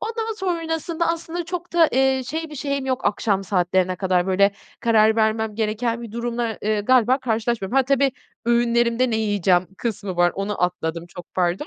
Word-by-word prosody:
Ondan 450 Hz, 0 st, -3 dB
sonrasında 335 Hz, -3 st, -2 dB
aslında 335 Hz, +1 st, -3 dB
çok 350 Hz, +1 st, -6 dB
da 335 Hz, -2 st, +5 dB, 0.3 s
şey 320 Hz, +5 st, -5 dB
bir -, -, -8 dB
şeyim 280 Hz, -1 st, -3 dB
yok. 260 Hz, -1 st, -2 dB
Akşam 200 Hz, -1 st, 0 dB
saatlerine 185 Hz, -1 st, +1 dB
kadar 185 Hz, -1 st, +1 dB
böyle 200 Hz, +1 st, +3 dB, 0.3 s
karar 220 Hz, -1 st, +4 dB
vermem 220 Hz, -1 st, +1 dB
gereken 230 Hz, +2 st, -1 dB
bir 225 Hz, -2 st, -9 dB
durumla, 235 Hz, -1 st, -3 dB
eee, 215 Hz, 0 st, +1 dB
galiba, 255 Hz, +3 st, +3 dB
karşılaşmıyorum. 230 Hz, -2 st, -1 dB
Ha, 270 Hz, -, +6 dB
tabii, 275 Hz, 0 st, +2 dB, 0.3 s
öğünlerimde 235 Hz, +1 st, +2 dB
ne 220 Hz, -, +1 dB
yiyeceğim 195 Hz, -4 st, +2 dB
kısmı 200 Hz, -5 st, -4 dB
var, 175 Hz, 0 st, +3 dB
onu 195 Hz, -1 st, -3 dB
atladım, 170 Hz, -1 st, -2 dB
çok 175 Hz, 0 st, -12 dB
pardon. 180 Hz, -, 0 dB
230 Hz, 165 wpm, -22 LUFS, 195-270 Hz, 0.3 s, Ha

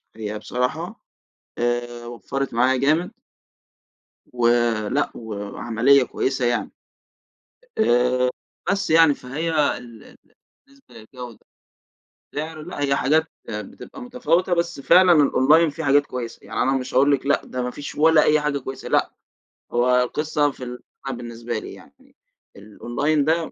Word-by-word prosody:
هي 105 Hz, -1 st, -5 dB
بصراحة 160 Hz, -, -3 dB, 0.6 s
آآ، 120 Hz, 0 st, -2 dB
وفرت 125 Hz, +2 st, -4 dB
معايا 130 Hz, +3 st, +3 dB
جامد. 155 Hz, +7 st, +1 dB, 1.2 s
ولأ، 120 Hz, +1 st, +1 dB
وعمليّة 115 Hz, +5 st, +1 dB
كويّسة 130 Hz, 0 st, -2 dB
يعني. 120 Hz, 0 st, -1 dB, 1.1 s
آآ، 125 Hz, -, +3 dB, 0.4 s
بس 200 Hz, 0 st, -1 dB
يعني 160 Hz, -2 st, +6 dB
فهي 140 Hz, +6 st, -4 dB, 0.3 s
ال 115 Hz, -3 st, -13 dB
ال -, -, -17 dB, 0.5 s
بالنسبة 275 Hz, -, -22 dB
للجودة، 120 Hz, +1 st, -11 dB, 1.0 s
سعر 155 Hz, +1 st, -5 dB
لأ، 165 Hz, -2 st, -7 dB
هي 140 Hz, -1 st, +1 dB
حاجات 155 Hz, +5 st, +2 dB, 0.2 s
بتبقى 105 Hz, -, -8 dB
متفاوتة 215 Hz, -8 st, 0 dB
بس 170 Hz, -3 st, -2 dB
فعلًا 180 Hz, +5 st, +6 dB
الأونلاين 150 Hz, +1 st, +4 dB
في 160 Hz, +3 st, -6 dB
حاجات 145 Hz, +1 st, +4 dB
كويّسة، 120 Hz, -2 st, -6 dB
يعني -, -, -3 dB
أنا 135 Hz, -, +2 dB
مش 130 Hz, -1 st, -7 dB
هاقول 140 Hz, +3 st, +4 dB
لِك 135 Hz, -1 st, 0 dB
لأ 140 Hz, -, +2 dB
ده 125 Hz, -, -4 dB
ما 125 Hz, -, -2 dB
فيش 145 Hz, +3 st, -8 dB
ولا 160 Hz, 0 st, +5 dB
أي 150 Hz, 0 st, +4 dB
حاجة 150 Hz, -1 st, -1 dB
كويّسة، 135 Hz, 0 st, -7 dB
لأ -, -, +2 dB, 0.6 s
هو 125 Hz, +1 st, +3 dB
القصّة 150 Hz, +2 st, 0 dB
في 130 Hz, -, -11 dB
ال 125 Hz, 0 st, -7 dB, 0.3 s
بالنسبة 120 Hz, -1 st, -5 dB
لي -, -, -9 dB
يعني 265 Hz, +1 st, -18 dB, 0.4 s
الأونلاين 120 Hz, +8 st, -1 dB
ده 160 Hz, +1 st, 0 dB
135 Hz, 135 wpm, -22 LUFS, 120-155 Hz, 1.2 s, يعني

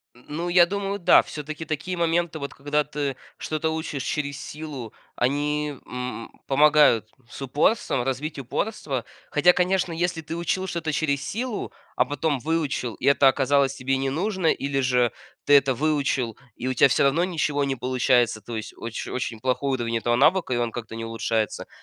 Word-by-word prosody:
Н 120 Hz, -, -20 dB
ну, 165 Hz, +4 st, -3 dB
я 175 Hz, 0 st, +6 dB
думаю, 200 Hz, +2 st, -3 dB
да. 175 Hz, -, +6 dB
Всё-таки 155 Hz, +1 st, -7 dB
такие 160 Hz, +4 st, -3 dB
моменты, 170 Hz, -1 st, +1 dB
вот 140 Hz, -1 st, -5 dB
когда 145 Hz, +2 st, 0 dB
ты 145 Hz, -1 st, -3 dB, 0.2 s
что-то 155 Hz, +1 st, -2 dB
учишь 160 Hz, -4 st, -3 dB
через 145 Hz, 0 st, -2 dB
силу, 145 Hz, -7 st, -7 dB, 0.2 s
они, 145 Hz, +2 st, 0 dB
м, 125 Hz, -2 st, -5 dB, 0.2 s
помогают 145 Hz, -5 st, +5 dB, 0.2 s
с -, -, -10 dB
упорством, 145 Hz, -, +1 dB
развить 135 Hz, +4 st, -3 dB
упорство. 135 Hz, -, -3 dB, 0.2 s
Хотя, 165 Hz, +4 st, +5 dB
конечно, 180 Hz, -1 st, +1 dB
если 170 Hz, 0 st, -1 dB
ты 160 Hz, +1 st, -6 dB
учил 170 Hz, +3 st, -1 dB
что-то 170 Hz, -3 st, -2 dB
через 140 Hz, -2 st, 0 dB
силу, 235 Hz, 0 st, -3 dB, 0.2 s
а -, -, +4 dB
потом 145 Hz, 0 st, -1 dB
выучил 150 Hz, -6 st, -1 dB
и -, -, -6 dB
это 140 Hz, 0 st, +5 dB
оказалось 135 Hz, 0 st, +2 dB
тебе 135 Hz, 0 st, -1 dB
не 135 Hz, 0 st, -1 dB
нужно, 185 Hz, +4 st, -1 dB
или 140 Hz, -2 st, +1 dB
же 125 Hz, -2 st, +2 dB, 0.3 s
ты 145 Hz, -, +4 dB
это 140 Hz, -2 st, +6 dB
выучил 135 Hz, -4 st, 0 dB, 0.2 s
и 125 Hz, -, -4 dB
у 130 Hz, -, 0 dB
тебя 130 Hz, -, +5 dB
всё -, -, +3 dB
равно 140 Hz, +5 st, +3 dB
ничего 150 Hz, -5 st, 0 dB
не 135 Hz, -1 st, 0 dB
получается, 125 Hz, -2 st, +2 dB
то 115 Hz, +3 st, -6 dB
есть 110 Hz, -, -6 dB
оч 115 Hz, 0 st, -5 dB
очень 120 Hz, -3 st, -4 dB
плохое 130 Hz, +3 st, 0 dB
уровень 115 Hz, -2 st, -1 dB
этого 120 Hz, +1 st, +1 dB
навыка 155 Hz, +2 st, +3 dB
и -, -, 0 dB
он 120 Hz, -1 st, 0 dB
как-то 115 Hz, -2 st, -7 dB
не 115 Hz, 0 st, -5 dB
улучшается, 115 Hz, -1 st, -2 dB
140 Hz, 180 wpm, -25 LUFS, 125-160 Hz, 0.3 s, я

